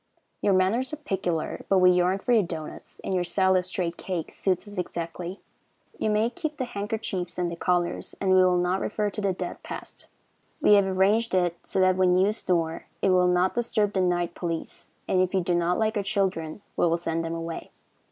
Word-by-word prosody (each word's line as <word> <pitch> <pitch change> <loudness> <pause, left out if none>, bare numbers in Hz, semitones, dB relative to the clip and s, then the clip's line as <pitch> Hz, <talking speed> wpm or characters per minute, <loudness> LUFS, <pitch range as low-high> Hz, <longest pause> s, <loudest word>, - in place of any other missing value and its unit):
Your 200 - +3
manners 210 +8 +2
are - - -3
peculiar, 190 - -2
but 195 - +4
we 180 -1 +6
yearn 180 +1 +2
for 200 - -2
your 230 -3 +6
doughnuts, 165 -4 -7
and - - -2
your 180 -1 +1
style 190 +2 +2
of 180 0 +1
streaked 175 -2 -3
cake 180 -4 -4
suits 190 +1 -1
us 205 -2 -6
exactly. 170 +1 -5 0.6
You - - 0
may 215 +2 +2
keep 310 -1 -4
the 255 - -1
handkerchiefs 205 -5 -4
and 175 -1 -1
the - - -4
collars, 175 0 -1
and 190 -1 +1
we 185 - +6
will 180 -1 +3
not 180 +2 +1
refer 210 0 -1
to 210 - -4
the 200 -1 +1
dead 185 - -5
past. - - -8 0.5
We - - +5
have 200 -1 +5
arranged 195 +4 +2
it 175 -2 +2
so - - -2
that 185 0 +4
when 180 -1 +4
you 195 +3 +4
snore 170 -6 -1 0.2
it - - +4
will 180 -1 +4
not 180 +1 +2
disturb 215 -3 0
the 190 - +1
night 175 -1 0
police, 165 -2 -5 0.2
and 185 - +3
if 185 +1 0
you 190 - +3
do 175 0 0
not 175 +1 +1
like 220 0 +1
our 205 - +1
children 195 -3 -1
we - - +3
will 165 0 +2
send 165 -1 -2
them 165 0 -3
away. 165 0 -5
185 Hz, 215 wpm, -26 LUFS, 175-200 Hz, 0.6 s, we